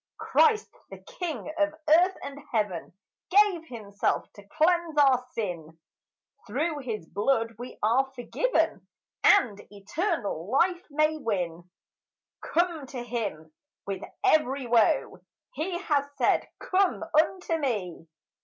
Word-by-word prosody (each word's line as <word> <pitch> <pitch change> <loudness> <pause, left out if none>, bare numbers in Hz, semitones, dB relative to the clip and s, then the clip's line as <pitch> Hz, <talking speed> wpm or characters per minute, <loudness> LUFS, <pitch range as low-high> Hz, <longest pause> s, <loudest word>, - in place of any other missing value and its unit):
Christ, 445 -2 +3 0.2
the - - -9
king 350 -10 -6
of 305 0 +1
earth 350 +5 +5
and 280 0 -7
heaven, 205 -7 -1 0.4
Gave 385 -4 +4
himself 205 -4 -2
to 205 - -14
cleanse 325 - +1
our 265 -3 +5
sin; 170 -7 -5 0.7
Through 295 +7 -1
his 220 -9 -5
blood 230 +3 0
we 245 +1 -8
are 260 +5 +2
forgiven - - 0 0.4
And 235 - +4
eternal 205 - -3
life 350 +8 +2
may 305 +1 +1
win. 180 - -3 0.7
Come 335 -4 0
to 250 -2 -6
him 205 -10 -4 0.3
with 195 -1 -4 0.2
every 295 -8 +2
woe; 235 -2 +2 0.3
He 350 -2 -2
has 290 -5 0
said, - - +2
"Come 375 -3 +1
unto 330 +2 +2
me." 200 - -3
270 Hz, 115 wpm, -27 LUFS, 210-330 Hz, 0.7 s, earth